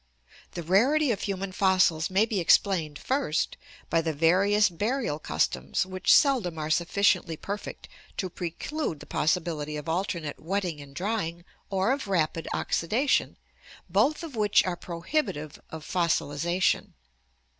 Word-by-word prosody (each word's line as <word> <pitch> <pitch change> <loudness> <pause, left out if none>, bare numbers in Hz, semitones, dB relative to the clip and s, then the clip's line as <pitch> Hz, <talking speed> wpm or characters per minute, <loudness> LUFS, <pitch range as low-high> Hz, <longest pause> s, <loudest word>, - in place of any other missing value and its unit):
The 170 - -5
rarity 255 - +3
of 210 - -2
human 195 -1 -3
fossils 185 -4 +2
may 195 +3 +3
be 220 -3 -1
explained, 165 -4 +3
first, 260 - -1 0.3
by 165 - +2
the 160 -1 -2
various 195 +7 +4
burial 205 - -2
customs 65 - -1
which 185 0 0
seldom 240 - +4
are 155 0 -3
sufficiently 175 -1 +2
perfect 205 +5 -6 0.3
to 190 - -1
preclude 175 - -4
the - - -11
possibility 155 -2 -1
of 150 - -7
alternate 170 -3 -2
wetting 180 -3 -2
and 140 -1 -13
drying 175 -3 -3 0.2
or 195 +4 +1
of 270 -4 -2
rapid 165 -3 0
oxidation, 235 - 0 0.5
both 260 - +2
of 315 -6 -7
which 210 -2 +3
are 180 -1 -1
prohibitive 170 - -3
of 160 -1 -8
fossilization. 170 0 0
180 Hz, 135 wpm, -27 LUFS, 160-205 Hz, 0.5 s, various